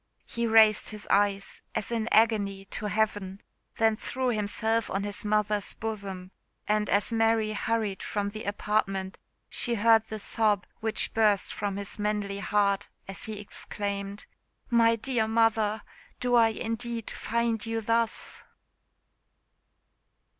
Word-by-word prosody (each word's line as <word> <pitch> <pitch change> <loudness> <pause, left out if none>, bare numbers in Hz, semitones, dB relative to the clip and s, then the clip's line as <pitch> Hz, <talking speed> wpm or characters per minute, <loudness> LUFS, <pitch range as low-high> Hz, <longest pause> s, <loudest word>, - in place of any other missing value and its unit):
He 235 0 -2
raised 220 -1 +5
his 210 -1 -8
eyes, 200 0 +1
as 220 +1 -2
in 230 -1 -1
agony, 205 -3 +3
to 210 - -3
heaven 205 -2 -1 0.4
then 225 -1 +3
threw 255 +3 -2
himself 220 +1 0
on 195 +1 -1
his 205 0 -4
mother's 210 -1 0
bosom; 195 -4 -5 0.4
and 210 0 +1
as 200 +3 +1
Mary 225 -1 +2
hurried 215 -2 -1
from 205 -1 -2
the 215 +1 -7
apartment 195 -2 -1 0.3
she 240 -2 0
heard 225 +1 +5
the 220 - -5
sob 210 -1 +1
which 220 -1 +1
burst 210 -3 +2
from 200 -1 -3
his 200 +1 -5
manly 205 -1 -1
heart, 200 -1 +1 0.2
as 195 0 -6
he 215 -2 -5
exclaimed, 200 0 -5 0.5
"My 230 -1 +5
dear 230 -1 -1
mother! 220 -1 +2 0.4
do 245 0 0
I 230 -2 +6
indeed 230 +1 -4
find 230 -1 -1
you 225 -1 -2
thus?" 230 +1 -1
215 Hz, 130 wpm, -28 LUFS, 200-225 Hz, 0.5 s, I